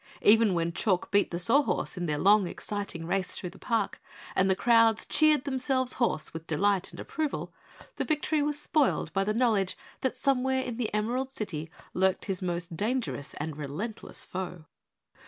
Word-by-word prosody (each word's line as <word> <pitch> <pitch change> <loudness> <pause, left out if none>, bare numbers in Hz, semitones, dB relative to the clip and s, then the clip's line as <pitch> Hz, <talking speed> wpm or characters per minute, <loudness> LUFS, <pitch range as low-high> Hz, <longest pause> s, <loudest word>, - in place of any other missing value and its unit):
Even 215 -2 +6
when 170 0 0
Chalk 185 0 0
beat 200 +1 +3
the 170 - -3
Sawhorse 235 +10 +2
in 175 -2 -3
their 150 -1 0
long, 200 +3 +5
exciting 200 -4 -4
race 185 +1 0
through 180 - -5
the - - -16
park, 225 -4 -1 0.3
and 190 +1 +3
the 190 - +4
crowds 230 0 +4
cheered 310 -3 +4
themselves 260 -2 0
hoarse 195 -10 0
with 160 0 -7
delight 195 +4 +1
and - - -11
approval, 310 -2 -3 0.4
the - - 0
victory 310 0 0
was 295 0 0
spoiled 295 -2 +1
by 195 - +2
the 210 - 0
knowledge 220 -6 +2 0.2
that 260 -1 -1
somewhere 265 -1 +1
in 240 -3 -5
the 240 -3 -2
Emerald 240 +5 -1
City 165 - -5 0.2
lurked 190 0 +1
his 195 -2 -2
most 175 -1 -2
dangerous 215 - -2
and 150 0 -5
relentless 155 +10 -5
foe. 180 -3 -6
205 Hz, 175 wpm, -28 LUFS, 180-255 Hz, 0.4 s, Even